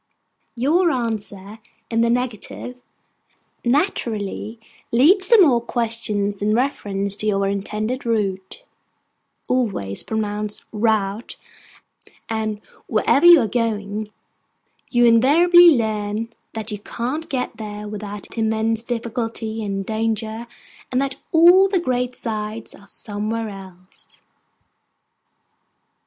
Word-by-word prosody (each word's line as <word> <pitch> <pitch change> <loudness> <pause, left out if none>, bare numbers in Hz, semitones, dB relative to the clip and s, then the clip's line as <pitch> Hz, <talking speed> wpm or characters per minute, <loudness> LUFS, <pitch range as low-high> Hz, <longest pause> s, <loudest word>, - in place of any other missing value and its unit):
Your 320 +9 +2
answer 215 -5 -4 0.3
in 230 0 +2
the 235 - +3
negative 250 +1 -3 0.8
naturally 235 - -1 0.3
leads 360 - +5
to 465 -2 +6
more 270 -11 +5
questions 220 -4 -2
in 210 +1 +2
reference 200 -6 -1
to 215 - -3
your 195 -1 +1
intended 215 +6 -3
route 205 - -2 0.8
(always 195 - -1
pronounced 210 -1 -3
rout); 215 -1 -1 0.9
and 215 -1 -3 0.3
wherever 300 +6 +3
you 345 -4 +9
are 225 - 0
going, 215 -2 -2 0.8
you 240 -1 +3
invariably 335 +10 +7
learn 215 0 -2 0.2
that 220 0 -4
you 210 - -4
can't 260 +10 -4
get 260 -3 -3
there 210 -1 -7
without 210 +1 -6
immense 220 0 0
difficulty 230 -2 -4
and 195 -1 -3
danger, 220 +1 -2 0.4
and 255 - +1
that 275 -1 -2
all 350 +4 +7
the 380 -2 +1
great 250 -5 -1
sights 215 -1 -5
are 200 - -17
somewhere 215 +2 -4
else. 190 -2 -14
225 Hz, 105 wpm, -21 LUFS, 210-250 Hz, 0.9 s, you